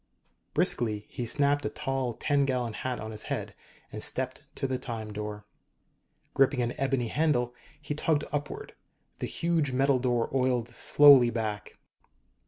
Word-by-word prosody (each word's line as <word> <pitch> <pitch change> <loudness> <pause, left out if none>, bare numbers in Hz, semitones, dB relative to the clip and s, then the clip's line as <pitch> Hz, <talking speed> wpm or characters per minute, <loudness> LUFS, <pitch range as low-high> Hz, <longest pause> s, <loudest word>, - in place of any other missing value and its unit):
Briskly, 105 -3 +1
he 120 - -5
snapped 145 +3 +1
a - - -1
tall 135 -3 -2
ten 145 +2 +1
gallon 125 -4 -1
hat 125 +4 -3
on 110 0 -6
his 105 -1 -5
head, - - -3 0.4
and - - -6
stepped - - 0
to - - -2
the 130 -1 -1
Time 110 -4 -6
Door. 105 0 -6 0.9
Gripping 135 -2 +3
an 120 - -2
ebony 135 -3 0
handle, 125 -6 +1 0.3
he 150 0 -4
tugged 150 0 +1
upward. 145 0 -4 0.5
The - - -2
huge 165 -5 0
metal 135 0 +3
door 120 -2 0
oiled 125 -3 +1
slowly 135 +1 +6
back. 110 -3 -4
125 Hz, 150 wpm, -28 LUFS, 115-140 Hz, 0.9 s, slowly